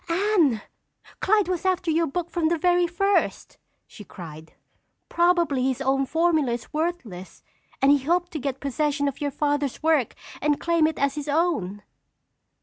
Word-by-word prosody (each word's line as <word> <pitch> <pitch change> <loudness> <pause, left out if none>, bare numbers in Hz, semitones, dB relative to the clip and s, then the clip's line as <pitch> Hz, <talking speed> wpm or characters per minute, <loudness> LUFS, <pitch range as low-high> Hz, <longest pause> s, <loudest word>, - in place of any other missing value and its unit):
"Anne, 335 - +2 0.6
Clyde 420 -1 +2
was 365 -2 -2
after 365 -3 0
your 330 +1 +1
book 345 +4 -4
from 340 -3 0
the 335 +1 +1
very 355 +1 +2
first!" 395 +4 -1 0.3
she 210 - -13
cried. 160 -4 -11 0.6
"Probably 340 -7 +2
his 260 -1 -1
own 270 0 +1
formula 320 -6 +1
is 235 +3 -7
worthless, 300 - -4 0.4
and 275 - +6
he 285 - +5
hoped 350 +2 +1
to 310 - -4
get 270 -1 -3
possession 285 +1 -1
of 280 0 -4
your 290 - 0
Father's 290 0 -1
work 310 -7 +2 0.3
and 295 -1 +1
claim 335 -2 +2
it 320 - -3
as 280 -1 +1
his 295 0 -6
own." 285 - 0
305 Hz, 160 wpm, -24 LUFS, 270-345 Hz, 0.6 s, and